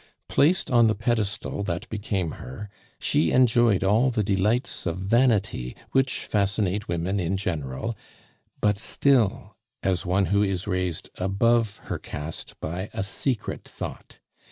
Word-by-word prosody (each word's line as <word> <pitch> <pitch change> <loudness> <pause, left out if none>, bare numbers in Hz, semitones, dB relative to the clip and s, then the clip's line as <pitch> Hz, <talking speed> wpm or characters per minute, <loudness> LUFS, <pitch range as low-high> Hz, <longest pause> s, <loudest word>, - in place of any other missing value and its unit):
Placed 170 +4 +3
on 120 -2 +6
the 110 - +2
pedestal 110 -2 -1
that 90 +5 -3
became 100 -6 -2
her, 100 +11 -8 0.3
she 80 - +1
enjoyed 120 -5 +4
all 110 +7 +4
the 110 -4 0
delights 105 +3 0
of 85 - -1
vanity 100 - +1 0.2
which 135 -1 +1
fascinate 100 -1 0
women 85 +4 -1
in 90 +2 0
general, 80 - -3 0.6
but 105 -1 +2
still 120 -2 +1 0.3
as 95 -2 +1
one 95 +2 +2
who 100 - +4
is 95 -2 0
raised 90 -4 -2
above 105 +3 +2
her - - -4
caste 75 +3 -7
by 90 +5 -4
a - - -1
secret 110 +4 -2
thought. - - -8
100 Hz, 135 wpm, -25 LUFS, 90-115 Hz, 0.6 s, on